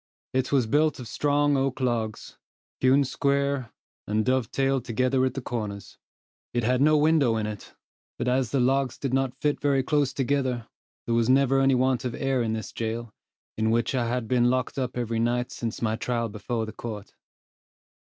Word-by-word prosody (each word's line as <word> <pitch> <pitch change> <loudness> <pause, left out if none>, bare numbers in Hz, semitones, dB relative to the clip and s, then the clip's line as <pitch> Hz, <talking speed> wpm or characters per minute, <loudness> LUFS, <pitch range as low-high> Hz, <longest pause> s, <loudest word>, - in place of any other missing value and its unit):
It 130 0 0
was 135 -4 +3
built 150 +7 +2
of 125 - -7
strong 145 +3 +1
oak 135 +1 0
logs, 115 -4 -2 0.4
hewn 130 +2 +4
square, 140 -1 0 0.4
and 105 +1 0
dovetailed 130 +1 +1
together 130 +2 +1
at 130 - -2
the 135 - -4
corners. 105 -6 -5 0.6
It 120 - +1
had 125 +3 +2
no 155 +1 +5
window 150 -6 +3
in 110 - -1
it; 105 -1 -7 0.4
but 125 - -2
as 125 -1 +1
the 135 - 0
logs 130 0 +1
did 135 -2 -3
not 135 0 0
fit 150 -1 0
very 140 -2 +2
close 145 -1 +1
together, 130 -3 -1 0.4
there 115 - -1
was 115 0 +2
never 135 0 +4
any 135 -1 +4
want 130 0 +1
of 125 -2 -3
air 135 -2 0
in 110 -1 -1
this 110 0 -5
jail, 115 0 -4 0.5
in 110 0 +2
which 115 +2 +1
I 120 -3 0
had 120 -1 -2
been 120 0 +3
locked 130 +2 -1
up 125 -1 -3
every 115 -2 -1
night 120 +1 0
since 115 0 -4
my 110 -1 +1
trial 115 -1 -1
before 110 +2 -3
the 110 - -8
court. 110 -3 -7
125 Hz, 185 wpm, -26 LUFS, 115-135 Hz, 0.6 s, no